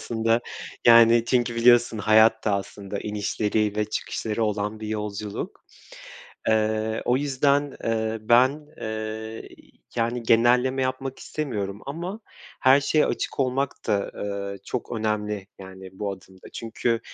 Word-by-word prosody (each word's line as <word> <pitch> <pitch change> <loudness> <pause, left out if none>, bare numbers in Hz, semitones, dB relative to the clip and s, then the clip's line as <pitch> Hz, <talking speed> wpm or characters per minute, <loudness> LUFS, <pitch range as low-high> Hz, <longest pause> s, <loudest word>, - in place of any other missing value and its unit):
aslında. 115 0 +1 0.5
Yani, 115 0 +7
çünkü 120 -1 +1
biliyorsun 120 -1 +4
hayat 110 +1 +4
da 105 -2 +2
aslında 100 0 -5
inişleri 105 0 -1
ve 105 - +1
çıkışları 110 +1 -3
olan 105 +1 -2
bir 110 - -5
yolculuk. 105 -1 -5 0.8
Eee, 110 0 +1
o 125 - +2
yüzden, 140 0 +1
eee, 110 0 -1
ben, 130 +7 +3
eee, 110 0 -5 0.5
yani, 115 +1 0
genelleme 125 +3 +3
yapmak 130 +1 -3
istemiyorum 105 -9 -4
ama 175 +9 -5 0.4
her 135 +2 +6
şeye 150 +2 +2
açık - - -3
olmak 135 +1 0
da, 100 -2 0
eee, 100 -1 -4
çok 125 - -5
önemli, 105 -3 -2
yani, 95 0 -10
bu 100 +1 -4
adımda. 95 0 -14
Çünkü 115 0 -2
110 Hz, 125 wpm, -25 LUFS, 105-125 Hz, 0.8 s, Yani